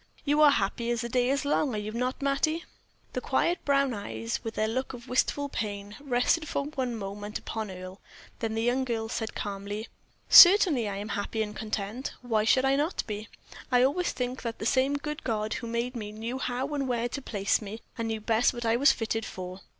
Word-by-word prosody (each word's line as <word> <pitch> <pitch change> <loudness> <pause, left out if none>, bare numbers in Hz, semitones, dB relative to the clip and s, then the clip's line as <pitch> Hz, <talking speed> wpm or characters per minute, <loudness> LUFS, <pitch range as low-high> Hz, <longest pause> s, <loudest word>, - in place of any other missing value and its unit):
You 295 +1 +3
are 300 - +9
happy 235 -1 0
as 240 -1 0
the 235 - -4
day 250 +1 +2
is 275 0 0
long, 285 -3 +1
are - - -1
you 210 +1 -4
not, 250 +4 -2
Mattie?" 310 +4 +1 0.5
The - - -2
quiet 345 0 +1
brown 275 -2 +2
eyes, 115 - -4
with 225 -1 -5
their 215 - +1
look 260 +4 -2
of 245 0 -10
wistful 285 +3 +1
pain, 205 -5 -4
rested 285 +4 +1
for 280 - -1
one 260 -5 -3
moment 205 0 -5
upon 220 -2 -5
Earle, 185 +1 -9 0.4
then 225 -1 -2
the 225 - 0
young 245 +3 +2
girl 225 -3 -2
said, 225 -1 -3
calmly: 205 +1 -5 0.4
"Certainly 350 - +8
I 200 - -4
am 205 +2 -5
happy 205 +2 -1
and 210 0 -7
content. 220 +3 -4
Why 220 -3 +1
should 260 +3 +4
I 270 0 +3
not 300 +5 0
be? 215 0 -5 0.4
I 250 0 +5
always 320 +7 +1
think 250 0 -3
that 230 -1 -4
the - - -5
same 265 +3 +2
good 300 +2 -5
God 215 -2 -1
who 235 - -4
made 235 +2 -2
me 210 -3 -5
knew 230 +4 -5
how 260 +3 -2
and 275 -2 -1
where 240 -1 0
to 280 - -5
place 200 -5 0
me, 215 +2 -7
and 230 -2 -3
knew 220 -1 -3
best 225 +3 +2
what 240 0 -4
I 225 +1 +3
was 275 +2 +6
fitted 225 -2 -2
for." 185 -2 -7
235 Hz, 215 wpm, -28 LUFS, 215-270 Hz, 0.5 s, are